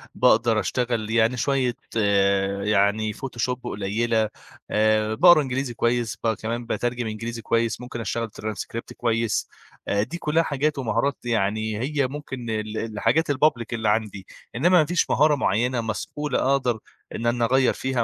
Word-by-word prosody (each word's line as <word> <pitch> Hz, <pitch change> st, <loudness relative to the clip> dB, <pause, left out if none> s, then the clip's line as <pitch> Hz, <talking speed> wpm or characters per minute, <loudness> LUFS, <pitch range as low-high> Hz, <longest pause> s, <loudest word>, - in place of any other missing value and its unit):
باقدر 115 Hz, -2 st, +4 dB
أشتغل 120 Hz, 0 st, -1 dB
يعني 115 Hz, +2 st, +2 dB
شويّة 130 Hz, -2 st, +1 dB, 0.2 s
آآ 100 Hz, -1 st, +2 dB
يعني 105 Hz, +1 st, +2 dB
Photoshop 125 Hz, 0 st, -3 dB
قليلة، 110 Hz, +1 st, 0 dB, 0.4 s
آآ 110 Hz, 0 st, +2 dB
باقرا 175 Hz, +3 st, +7 dB
إنجليزي 130 Hz, -2 st, -2 dB
كويّس 120 Hz, -1 st, 0 dB
بقى 115 Hz, -1 st, +1 dB
كمان 115 Hz, +3 st, -4 dB
باترجم 120 Hz, 0 st, -2 dB
إنجليزي 115 Hz, +2 st, -5 dB
كويّس، 115 Hz, +1 st, 0 dB
ممكن 125 Hz, -1 st, -6 dB
أشتغل 115 Hz, 0 st, -2 dB
transcript 110 Hz, +2 st, -5 dB
كويّس، 115 Hz, -2 st, 0 dB, 0.4 s
آآ 100 Hz, 0 st, +1 dB
دي 155 Hz, +10 st, -6 dB
كلّها 165 Hz, 0 st, +1 dB
حاجات 150 Hz, 0 st, -1 dB
ومهارات 130 Hz, +3 st, 0 dB
يعني 110 Hz, -1 st, 0 dB
هي 140 Hz, +2 st, 0 dB
ممكن 130 Hz, -3 st, -7 dB
ال 110 Hz, 0 st, -3 dB
الحاجات 115 Hz, +8 st, 0 dB
الpublic 140 Hz, -4 st, +2 dB
اللي 110 Hz, -2 st, 0 dB
عندي، 105 Hz, -3 st, -1 dB, 0.3 s
إنّما 145 Hz, +9 st, +3 dB
ما 155 Hz, -, +4 dB
فيش 175 Hz, +3 st, 0 dB
مهارة 150 Hz, +1 st, +4 dB
معيّنة 120 Hz, 0 st, 0 dB
مسؤولة 135 Hz, +6 st, -3 dB
أقدر 125 Hz, -5 st, +1 dB, 0.4 s
إن 115 Hz, -, -4 dB
أنا 120 Hz, 0 st, +2 dB
أغيَّر 130 Hz, +2 st, +3 dB
فيها 130 Hz, -2 st, -1 dB
115 Hz, 150 wpm, -24 LUFS, 110-130 Hz, 0.4 s, باقرا